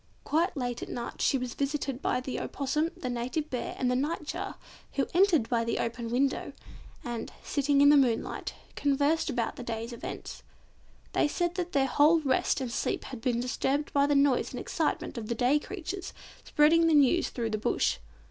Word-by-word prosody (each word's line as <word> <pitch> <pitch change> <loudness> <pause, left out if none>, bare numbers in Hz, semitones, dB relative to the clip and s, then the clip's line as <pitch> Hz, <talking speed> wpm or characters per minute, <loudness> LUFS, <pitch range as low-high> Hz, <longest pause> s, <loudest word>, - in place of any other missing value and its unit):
Quite 335 +2 +1
late 245 -2 -2
at - - -6
night 235 - -5
she 275 - +3
was 250 -2 -4
visited 280 -2 -2
by 250 - +1
the 260 0 -4
Opossum, 300 +4 -1
the 260 - -5
Native 250 +6 -3
Bear, 250 - -3
and 250 -1 +1
the - - +1
Nightjar, 300 +3 -3 0.4
who 270 - +1
entered 345 - +4
by 235 -2 +1
the 230 - -1
open 230 0 -3
window, 265 +3 0 0.5
and, 240 -1 -5
sitting 285 0 +2
in 285 - +8
the 295 - +7
moonlight, 245 -5 0 0.2
conversed 290 +3 +1
about 245 -4 -2
the 250 - -6
day's 230 0 -4
events. 235 - -7 0.7
They - - +3
said 345 +3 -1
that 355 -1 -4
their 275 -1 +3
whole 300 +5 +4
rest 270 -1 +1
and 255 -3 -3
sleep - - -1
had 250 -4 -8
been 240 0 0
disturbed 265 +4 -1
by 280 0 +4
the 290 - +2
noise 280 -2 +3
and - - -4
excitement 240 - -2
of 215 - -7
the 235 - -1
day 255 +5 +3
creatures 375 +2 -6 0.3
spreading 325 +3 +4
the 320 - +4
news 290 +4 +4
through 230 -2 -3
the 215 - -1
Bush. 205 - +1
275 Hz, 190 wpm, -29 LUFS, 245-300 Hz, 0.7 s, in